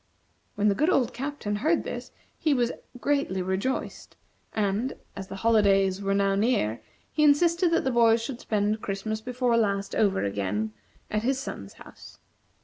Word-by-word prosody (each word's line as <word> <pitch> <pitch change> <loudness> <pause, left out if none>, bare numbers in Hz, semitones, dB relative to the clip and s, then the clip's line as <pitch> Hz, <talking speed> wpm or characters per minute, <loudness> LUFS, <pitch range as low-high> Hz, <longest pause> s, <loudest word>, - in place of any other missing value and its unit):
When 210 +1 +2
the 205 - +4
good 305 - +2
old 255 -8 +2
Captain 250 -5 -3
heard 320 +10 +1
this - - -6 0.3
he 305 -3 +2
was 245 -1 +1 0.3
greatly 280 -10 0
rejoiced, 190 +8 -3 0.4
and, 215 +5 0 0.2
as 190 -1 -6
the 195 - -7
holidays 195 -4 +4
were 195 0 0
now 200 0 +2
near, 195 - +1 0.3
he 305 - +1
insisted 335 +4 +4
that 335 - +2
the 265 - 0
boys 230 -1 +5
should 235 +2 -5
spend 210 0 0
Christmas 215 +2 -3
before 250 0 0
last 200 -3 0
over 200 -3 +2
again, 100 +2 -2 0.4
at 210 - 0
his 260 +3 +1
son's 100 - -7
house. - - -14
215 Hz, 160 wpm, -27 LUFS, 195-260 Hz, 0.4 s, boys